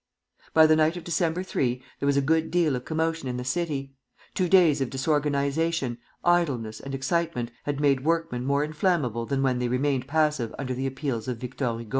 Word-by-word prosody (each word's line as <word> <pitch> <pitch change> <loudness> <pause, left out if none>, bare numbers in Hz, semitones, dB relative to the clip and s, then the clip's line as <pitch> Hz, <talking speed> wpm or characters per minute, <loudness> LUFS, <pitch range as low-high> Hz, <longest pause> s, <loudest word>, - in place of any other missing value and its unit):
By 160 0 +8
the 155 0 +5
night 160 +2 +2
of 175 - -7
December 170 0 0
3 125 -8 -1 0.2
there 140 - -1
was 140 0 +3
a 140 - +3
good 160 +3 +2
deal 170 -6 +2
of 125 - -5
commotion 160 -3 -1
in 125 - -3
the 125 - -4
city. 140 -3 -2 0.4
Two 180 -2 0
days 165 -7 +5
of 130 - 0
disorganization, 140 -1 0 0.3
idleness, 135 -11 +1
and 135 0 -6
excitement 135 -3 -1
had 145 -1 -2
made 140 -3 +2
workmen 165 -6 0
more 140 +2 +1
inflammable 150 - 0
than 135 -1 0
when 130 -2 +1
they 125 - 0
remained 130 +1 0
passive 150 -6 0
under 130 -2 -3
the 130 +2 -2
appeals 135 -4 -3
of 125 -2 -2
Victor 125 -1 -3
Hugo. 115 -2 -9
140 Hz, 195 wpm, -26 LUFS, 130-160 Hz, 0.4 s, By